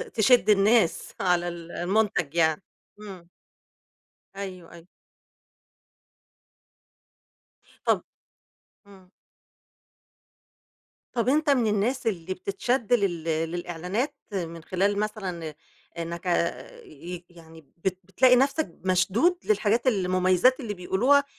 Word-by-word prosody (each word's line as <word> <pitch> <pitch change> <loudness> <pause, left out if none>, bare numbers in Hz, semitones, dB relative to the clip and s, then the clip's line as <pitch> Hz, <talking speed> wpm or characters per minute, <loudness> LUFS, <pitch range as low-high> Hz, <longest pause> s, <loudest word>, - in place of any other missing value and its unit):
تشد 230 +1 +4
الناس 210 -2 +3
على 175 -1 +1
ال 170 -1 -7
المنتج 180 -4 0
يعني 160 0 +2 0.4
إمم. 190 -5 -11 1.1
أيوه، 185 -3 -7
أيوه. 170 +1 -14 3.0
طَب - - +2 0.8
إمم. 190 -2 -17 2.0
طَب 240 0 +1
أنت 300 +2 +2
من 250 -5 +3
الناس 220 +5 0
اللي 185 -3 -2
بتتشد 220 +6 -1
لل 190 -8 +1
للإعلانات 175 - -2 0.2
من 170 -3 -4
خلال 200 +4 0
مثلًا 185 -7 -4 0.4
إنك 170 +1 -5
ع 175 - +3 0.5
ي 170 +4 -9
يعني 165 -2 -15 0.2
بت 185 +2 -2
بتلاقي 250 +7 +4
نفسك 275 +4 +1
مشدود 195 - +2
للحاجات 215 +4 +1
المميزات 185 - +3
اللي 225 -5 -4
بيقولوها، 225 +10 +3
190 Hz, 95 wpm, -26 LUFS, 175-225 Hz, 3.0 s, تشد